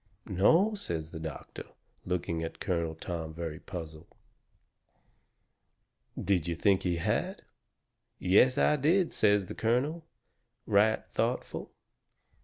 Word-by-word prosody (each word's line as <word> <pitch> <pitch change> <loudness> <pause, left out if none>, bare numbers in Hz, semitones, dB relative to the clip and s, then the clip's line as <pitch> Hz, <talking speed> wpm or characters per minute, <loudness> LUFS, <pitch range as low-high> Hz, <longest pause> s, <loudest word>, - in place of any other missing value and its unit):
"No," 160 - +4
says 80 - -4
the 80 - -7
doctor, 80 -2 -7 0.4
looking 85 -2 -1
at 80 - -5
Colonel 85 -3 -1
Tom 80 -1 -5
very 80 -2 -5
puzzled, 80 -3 -8 2.1
"did 90 -5 +1
you 85 - -1
think 95 +3 +3
he 90 -2 0
had?" 110 - -1 0.7
"Yes, 105 +8 +4
I 150 - +4
did," 165 +6 +2
says 105 -2 +3
the - - -7
colonel, 135 +9 0 0.6
right 105 +1 +3
thoughtful. - - -2
95 Hz, 110 wpm, -30 LUFS, 80-125 Hz, 2.1 s, No